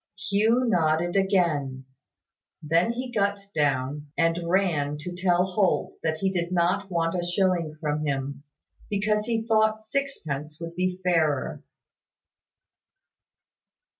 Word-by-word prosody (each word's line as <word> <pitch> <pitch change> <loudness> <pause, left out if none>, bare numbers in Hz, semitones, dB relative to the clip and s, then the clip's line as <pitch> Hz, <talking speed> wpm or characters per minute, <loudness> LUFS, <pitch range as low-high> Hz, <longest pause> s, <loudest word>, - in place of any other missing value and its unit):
Hugh 225 +5 +3
nodded 170 -3 +2
again. 165 -9 +1 0.8
Then 165 +9 +2
he 250 +1 -5
got 200 -3 +1 0.2
down, 145 0 0
and 165 +1 +1
ran 160 -6 +1
to 175 +3 -5
tell 180 0 +2
Holt 190 0 0
that 160 -1 -1
he 190 +2 0
did 175 -1 -1
not 180 +2 +1
want 165 -2 0
a 180 -1 -1
shilling 175 -3 0
from 150 -1 -1
him, 140 -1 -3 0.5
because 210 +1 0
he 225 -1 0
thought 220 -1 +2
sixpence 160 - -4
would 165 0 -7
be 185 +1 -1
fairer. 160 -6 +1
175 Hz, 120 wpm, -26 LUFS, 155-200 Hz, 0.8 s, Hugh